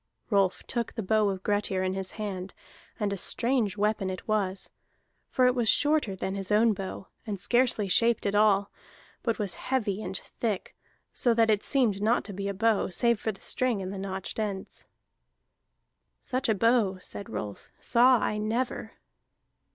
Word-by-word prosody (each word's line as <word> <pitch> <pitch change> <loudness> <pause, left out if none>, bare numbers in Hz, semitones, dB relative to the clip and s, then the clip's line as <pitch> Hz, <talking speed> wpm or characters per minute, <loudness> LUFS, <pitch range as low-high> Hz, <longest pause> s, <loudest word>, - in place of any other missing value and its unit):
Rolf 195 -2 +2
took 235 -2 -2
the 225 - -3
bow 215 +1 +2
of 190 -1 -4
Grettir 205 -2 0
in 185 0 0
his 190 -1 -4
hand, 195 -3 -5 0.4
and 205 -1 0
a - - -3
strange 230 0 +1
weapon 210 -2 0
it 185 -1 -6
was. 200 -3 -1 0.6
For 255 - +2
it 250 - +4
was 240 -3 +1
shorter 295 -9 +3
than 190 0 -3
his 195 0 -4
own 220 +2 +4
bow, 190 -1 -7 0.2
and 205 -2 -3
scarcely 240 -1 +2
shaped 230 +4 +3
at 200 - +1
all, 205 -1 +3 0.5
but 230 -3 -1
was 200 -4 -2 0.2
heavy 215 -6 0
and 190 - -4
thick, 215 -1 -4 0.4
so 240 -2 +2
that 225 -1 +4
it 210 -1 +2
had - - -15
seemed 230 -8 +2
not 225 +3 +2
to 205 - -8
be 200 +1 -4
a 200 - -2
bow, 225 +1 +2
save 235 +4 +2
for 220 - -1
the 195 - -16
string 250 -5 0
and 190 0 -5
the 195 - -5
notched 190 +1 -4
ends. 200 -3 -4 1.3
"Such 260 0 -2
a 220 - +3
bow," 225 -3 +2
said 200 +1 -7
Rolf, 100 -1 -6
"saw 250 +2 +5
I 210 -1 -1
never." 230 +4 -2
210 Hz, 180 wpm, -28 LUFS, 195-230 Hz, 1.3 s, saw